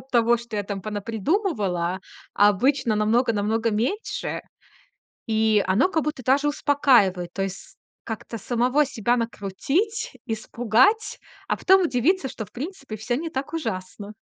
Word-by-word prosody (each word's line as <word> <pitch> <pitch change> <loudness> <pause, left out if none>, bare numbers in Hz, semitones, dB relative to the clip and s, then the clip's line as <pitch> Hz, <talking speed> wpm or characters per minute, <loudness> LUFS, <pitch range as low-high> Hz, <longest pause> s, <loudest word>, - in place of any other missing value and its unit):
от 265 - -19
того, 235 0 +4
что 235 -2 -7
я 205 - 0
там 200 0 -5
понапридумывала, 210 - -1 0.3
а 205 +1 +6
обычно 245 +3 +2
намного 230 +3 +2
намного 220 +2 0
меньше. 250 - -2 0.8
И 220 -2 +3
оно 195 - +3
как 320 -5 0
будто 300 -3 -3
даже 280 +3 +3
успокаивает. 240 -13 +3
То 195 - -3
есть 195 0 -6 0.3
как-то 225 +1 -6
самого 250 +7 +2
себя 240 -2 0
накрутить, 275 - -2
испугать, 245 - +1 0.3
а - - +1
потом 380 0 +5
удивиться, 310 +2 +1
что, 220 - -6
в 195 - -20
принципе, 275 - -6
всё 220 +3 -2
не 325 +4 -4
так 280 +1 -4
ужасно. 200 - -5
235 Hz, 145 wpm, -24 LUFS, 210-285 Hz, 0.8 s, а